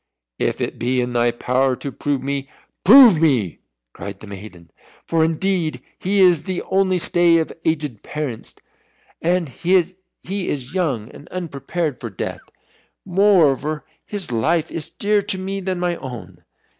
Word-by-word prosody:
"If - - -1
it - - -3
be 125 +2 +1
in 125 0 -1
thy 120 0 +3
power 125 +2 +1
to 140 - -6
prove 140 -1 -2
me 140 0 -3 0.3
prove 225 - +9
me!" 125 - +2 0.3
cried 100 -1 -8
the - - -10
maiden; 95 -4 -11 0.3
"for 165 -1 +2
indeed 165 -3 0 0.2
he 195 +2 +1
is 175 -5 +5
the 185 -2 -3
only 190 -1 +2
stay 175 -1 +3
of 160 - -1
aged 150 -8 -1
parents, 145 -7 -5 0.7
and 175 0 +1
he 175 +8 0
is 185 0 +1 0.8
young 140 - -1
and 145 - -13
unprepared 160 -3 -3
for 115 - -5
death. 95 - -5 0.6
Moreover 165 -7 +3 0.2
his 200 -10 -6
life 155 +8 +1
is 160 -1 -3
dearer 205 0 +1
to 200 -1 0
me 195 +1 -3
than 185 -1 -2
my 175 -1 0
own." 95 - -9
160 Hz, 150 wpm, -21 LUFS, 125-185 Hz, 0.8 s, prove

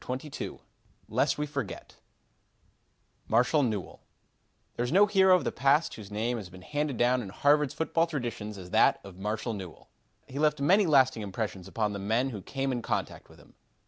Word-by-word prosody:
CHAPTER 130 +4 -5
XXII - - -6 0.5
LEST - - +1
WE 150 - -1
FORGET 140 -8 -6 1.3
Marshall 125 +7 +3
Newell 110 -8 -3 0.7
There 120 - -1
is 120 - -2
no 195 +5 +6
hero 190 -2 +5
of 180 - +1
the - - -1
past 140 +5 +2
whose 105 -3 -10
name 115 +4 -1
has 100 -5 -7
been 90 0 -13
handed 145 +1 -2
down 125 +2 +3
in 105 - -7
Harvard's 145 +6 +2
football 165 +1 +1
traditions 120 -8 -4
as 90 -1 -10
that - - +4
of 95 -2 -12
Marshall 110 +3 -2
Newell. 95 -6 -9 0.4
He 140 - -7
left 150 -1 +2
many 190 +7 +4
lasting 130 -6 +4
impressions 100 -2 -4
upon 105 +1 -1
the 100 - -4
men 115 +7 0
who 105 -4 -6
came 135 +6 -3
in 120 -2 -2
contact - - -3
with - - -17
him. - - -20
125 Hz, 185 wpm, -29 LUFS, 105-145 Hz, 1.3 s, no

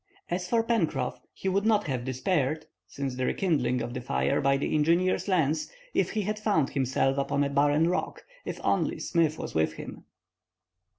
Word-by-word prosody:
As 180 +1 -2
for 230 -1 +3
Pencroff, 225 -9 0
he - - -6
would 195 +1 +2
not 215 -1 +3
have 130 -4 -2
despaired, 140 +3 0 0.2
since 135 +7 -4
the 130 0 -1
rekindling 135 -10 +1
of 120 - -5
the 125 - -4
fire 65 - 0
by 135 0 +3
the 135 - -2
engineer's 170 +6 +2
lens, 160 -5 +1 0.2
if - - +2
he 215 - 0
had 210 +2 -2
found 200 -10 +1
himself 135 0 +1
upon 140 +1 +1
a 140 - -1
barren 145 +3 +3
rock, 180 - -2 0.2
if - - -5
only - - +1
Smith 160 -3 +1
was - - -6
with 80 0 +1
him. - - -9
150 Hz, 180 wpm, -28 LUFS, 135-185 Hz, 0.2 s, for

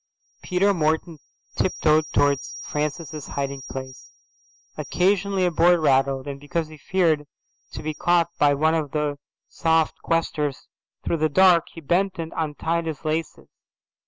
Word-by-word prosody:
Peter 195 +3 +2
Morton 160 -1 -1 0.4
tiptoed 155 -4 +2
towards 140 -1 +1
Francis's 150 0 -4
hiding 140 -1 -4
place. 130 -1 -8 0.7
Occasionally 195 0 +1
a 175 - +1
board 170 +2 +4
rattled, 135 -2 +2
and 140 -1 -5
because 155 +2 -3
he 155 - -12
feared 160 -4 +1 0.5
to - - -6
be 155 0 -2
caught 170 +2 +2
by 145 -1 +4
one 155 +3 +2
of 155 -4 -2
the 150 -2 -1 0.3
soft 160 -1 +1
questers 150 -4 -1 0.4
through 170 - 0
the 155 0 +1
dark, 175 +1 +5
he 165 - -9
bent 185 +5 0
and 165 -1 -5
untied 165 +2 -2
his 155 0 -6
laces. 155 +1 -3
155 Hz, 140 wpm, -24 LUFS, 145-170 Hz, 0.7 s, dark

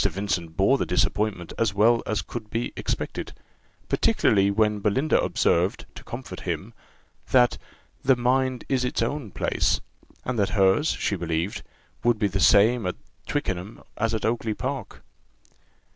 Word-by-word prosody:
Vincent 90 -4 -2
bore 100 +8 +4
the - - 0
disappointment 95 +1 0
as 110 -3 +1
well 115 +3 +4
as 110 -1 -1
could 110 -3 -7
be 115 +3 -3
expected; - - -4 0.5
particularly 100 -1 +3
when 105 0 +2
Belinda 120 +9 +2
observed, 90 +3 +1
to - - -11
comfort - - -7
him, - - -4 0.6
that 125 -2 +4 0.4
"the 135 0 +5
mind 130 +1 0
is 130 -2 +1
its 125 -2 0
own 120 -1 -3
place;" - - 0 0.5
and 125 -3 -2
that 100 - +2
hers, 95 +10 +4
she 100 - -1
believed, 85 +2 -2 0.4
would 120 -1 +3
be 105 -1 +1
the 95 0 -2
same 105 +2 +5
at 90 - -2 0.3
Twickenham 95 +3 -3
as 115 +1 0
at 110 - -2
Oakly 115 -1 -1
park. 130 -1 -5
110 Hz, 145 wpm, -25 LUFS, 100-120 Hz, 0.6 s, the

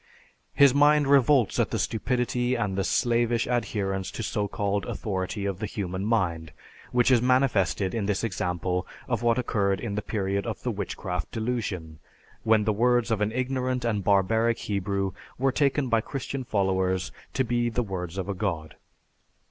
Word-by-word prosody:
His 140 -2 +6
mind 145 +1 +5
revolts 135 -3 +4
at - - +2
the - - -2
stupidity 125 +2 0
and 105 -5 -1
the 95 - 0
slavish 120 +2 +1
adherence 100 -5 -1
to 115 - -5
so 105 0 -1
called 100 -2 -1
authority 100 0 -3
of 100 -2 -2
the 110 - -2
human 95 -1 -4
mind, 85 -8 0 0.4
which 125 +1 +3
is 120 -3 +5
manifested 120 -7 +2
in 110 -4 -1
this 105 +1 0
example 90 -3 -2 0.2
of - - -1
what 120 0 +2
occurred 100 -5 0
in 115 -4 -4
the 105 - -1
period 100 -1 -2
of - - -5
the - - 0
Witchcraft 90 -3 -4
Delusion, 105 -9 -3 0.4
when 110 -1 +3
the 110 0 +1
words 120 +2 +2
of 110 -2 +1
an 105 +1 +1
ignorant 130 0 -1
and 105 -4 0
barbaric 110 +4 +2
Hebrew 100 -1 -2 0.3
were 135 +2 +2
taken 140 0 +1
by 115 -2 +2
Christian 135 +2 -5
followers 95 -4 0 0.2
to 130 - +2
be 120 0 0
the 120 +1 -1
words 90 -3 -5
of 95 -1 -3
a 100 - -1
god. 85 -6 -3
110 Hz, 170 wpm, -26 LUFS, 95-120 Hz, 0.4 s, His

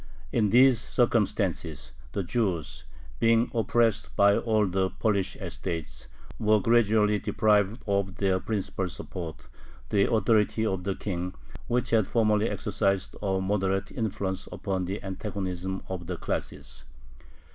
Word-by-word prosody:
In 110 -3 +2
these 125 +1 +6
circumstances 100 - 0 0.2
the 100 - -1
Jews, 85 -7 -2 0.3
being 115 +1 +3
oppressed 115 -1 +1
by 100 0 +5
all 110 -2 +2
the 95 0 0
Polish 100 -3 0
estates, 75 -8 -5 0.3
were 110 0 +4
gradually 105 -1 +3
deprived 105 0 +1
of 100 -2 0
their 95 -2 +1
principal 95 -3 -2
support, 85 -2 -7 0.4
the 100 -1 +2
authority 110 0 +2
of 95 -4 -2
the 100 -1 -1
king, 90 -2 -4 0.3
which 125 0 0
had 110 -4 +3
formerly 110 -1 +2
exercised 100 -3 -1
a 95 -2 0
moderating 95 +1 -1
influence 95 -4 -2
upon 95 -2 -2
the 95 +4 -4
antagonism 95 -1 -4
of 90 -3 -5
the 90 -1 -3
classes. - - -5
100 Hz, 125 wpm, -27 LUFS, 95-110 Hz, 0.4 s, these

